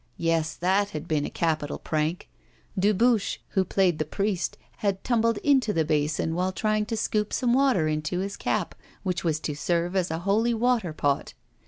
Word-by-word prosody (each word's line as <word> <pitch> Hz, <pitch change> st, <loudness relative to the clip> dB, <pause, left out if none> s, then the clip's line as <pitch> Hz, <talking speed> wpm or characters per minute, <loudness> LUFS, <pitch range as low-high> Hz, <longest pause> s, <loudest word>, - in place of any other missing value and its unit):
Yes! 165 Hz, -2 st, 0 dB
that 195 Hz, +3 st, +1 dB
had 150 Hz, -, -7 dB
been 150 Hz, -2 st, 0 dB
a -, -, -5 dB
capital 155 Hz, -3 st, -1 dB
prank. 155 Hz, +2 st, -2 dB, 0.5 s
Dubuche, 210 Hz, +3 st, +2 dB
who 190 Hz, -, +2 dB
played 185 Hz, -3 st, +1 dB
the -, -, +2 dB
priest, 190 Hz, +4 st, -2 dB, 0.2 s
had 200 Hz, -2 st, -1 dB
tumbled 230 Hz, -2 st, +2 dB
into 265 Hz, -7 st, +3 dB
the 160 Hz, -3 st, +1 dB
basin 155 Hz, +1 st, 0 dB
while 180 Hz, +2 st, 0 dB
trying 215 Hz, +2 st, 0 dB
to 225 Hz, 0 st, -2 dB
scoop 210 Hz, 0 st, 0 dB
some 245 Hz, -2 st, +1 dB
water 260 Hz, -, +3 dB
into 155 Hz, +3 st, -1 dB
his 195 Hz, +2 st, -3 dB
cap, -, -, -1 dB, 0.3 s
which 180 Hz, -3 st, -2 dB
was 160 Hz, -3 st, 0 dB
to 150 Hz, -, -2 dB
serve 170 Hz, +4 st, -1 dB
as 185 Hz, -2 st, +1 dB
a 160 Hz, -, -2 dB
holy 225 Hz, +4 st, +2 dB
water 230 Hz, -6 st, +1 dB
pot. 145 Hz, -2 st, -1 dB
185 Hz, 180 wpm, -26 LUFS, 160-215 Hz, 0.5 s, into